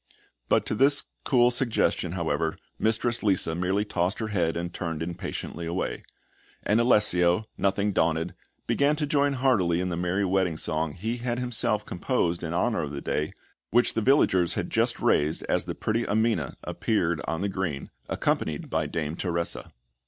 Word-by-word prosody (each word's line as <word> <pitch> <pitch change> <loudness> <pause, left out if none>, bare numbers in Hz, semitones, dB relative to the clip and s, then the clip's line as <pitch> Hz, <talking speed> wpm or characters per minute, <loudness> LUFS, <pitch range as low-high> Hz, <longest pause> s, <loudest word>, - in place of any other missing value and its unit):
But - - +3
to - - -2
this 140 +6 +3 0.2
cool 125 -2 +4
suggestion, 115 -8 +1
however, 80 -2 -1 0.2
Mistress 115 +2 +1
Lisa 95 -5 +2
merely 95 +4 0
tossed 95 -1 -1
her 110 -1 -3
head, 85 -6 0
and 85 +1 -4
turned 80 -2 -3
impatiently 85 0 -5
away; 85 +3 -2 0.6
and 110 +3 +3
Alessio, 105 -5 +4
nothing 100 +1 +1
daunted, 80 +1 +1 0.3
began 145 +2 +2
to 150 0 -1
join 140 -1 +2
heartily 110 -11 +2
in 90 0 -1
the 85 - -2
merry 90 +3 0
wedding 95 -3 +1
song 80 -1 -1
he 110 +8 -3
had 120 0 -2
himself 115 -4 -1
composed 90 -3 -1
in 85 - -4
honour 110 +7 +1
of 75 - -4
the 70 - -4
day, 75 +1 -1 0.4
which 120 +2 +3
the 115 - 0
villagers 100 - +3
had - - -3
just - - +1
raised 75 +2 +2
as - - +1
the - - -4
pretty 115 +2 -1
Amina 110 +2 0
appeared 85 -8 0
on 80 - -2
the 100 - 0
green, 90 -8 -3 0.2
accompanied - - -1
by - - 0
Dame 80 0 -3
Teresa. 85 -1 -3
95 Hz, 165 wpm, -27 LUFS, 85-115 Hz, 0.6 s, cool